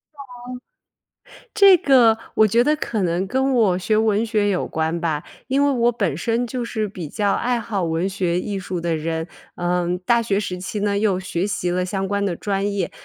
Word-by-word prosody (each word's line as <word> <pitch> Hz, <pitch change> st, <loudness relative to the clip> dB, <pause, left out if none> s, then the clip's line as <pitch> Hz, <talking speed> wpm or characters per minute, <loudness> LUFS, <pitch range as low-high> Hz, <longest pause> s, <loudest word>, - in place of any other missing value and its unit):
哦， -, -, -21 dB, 1.4 s
这 395 Hz, -3 st, +7 dB
个 245 Hz, -7 st, +4 dB, 0.2 s
我 215 Hz, -, +5 dB
觉 230 Hz, +4 st, +3 dB
得 300 Hz, +3 st, +2 dB
可 220 Hz, -8 st, -2 dB
能 175 Hz, +2 st, 0 dB
跟 265 Hz, +4 st, 0 dB
我 200 Hz, -7 st, +3 dB
学 215 Hz, +3 st, 0 dB
文 220 Hz, 0 st, +2 dB
学 210 Hz, -2 st, +1 dB
有 185 Hz, -, -1 dB
关 160 Hz, +2 st, -2 dB
吧。 155 Hz, -3 st, -1 dB, 0.2 s
因 275 Hz, +2 st, +2 dB
为 285 Hz, -, +3 dB
我 240 Hz, -2 st, +2 dB
本 235 Hz, -, -1 dB
身 235 Hz, +1 st, -1 dB
就 245 Hz, 0 st, -4 dB
是 220 Hz, -2 st, -2 dB
比 175 Hz, -6 st, -7 dB
较 205 Hz, +3 st, 0 dB
爱 245 Hz, -1 st, 0 dB
好 205 Hz, -5 st, -2 dB
文 165 Hz, +3 st, -1 dB
学 180 Hz, -3 st, -1 dB
艺 200 Hz, -1 st, -4 dB
术 180 Hz, -2 st, -4 dB
的 165 Hz, -1 st, -1 dB
人， 160 Hz, +1 st, -3 dB, 0.3 s
嗯， 175 Hz, 0 st, -1 dB
大 235 Hz, +5 st, +2 dB
学 205 Hz, -3 st, 0 dB
时 180 Hz, -3 st, -3 dB
期 195 Hz, +3 st, -5 dB
呢， 200 Hz, -1 st, 0 dB
又 200 Hz, -3 st, +1 dB
学 185 Hz, 0 st, -2 dB
习 180 Hz, -3 st, -2 dB
了 180 Hz, +1 st, 0 dB
相 195 Hz, +1 st, -2 dB
关 200 Hz, +1 st, -1 dB
的 175 Hz, -4 st, -1 dB
专 200 Hz, 0 st, -2 dB
业。 190 Hz, -4 st, -2 dB
200 Hz, 220 characters per minute, -21 LUFS, 180-230 Hz, 1.4 s, 这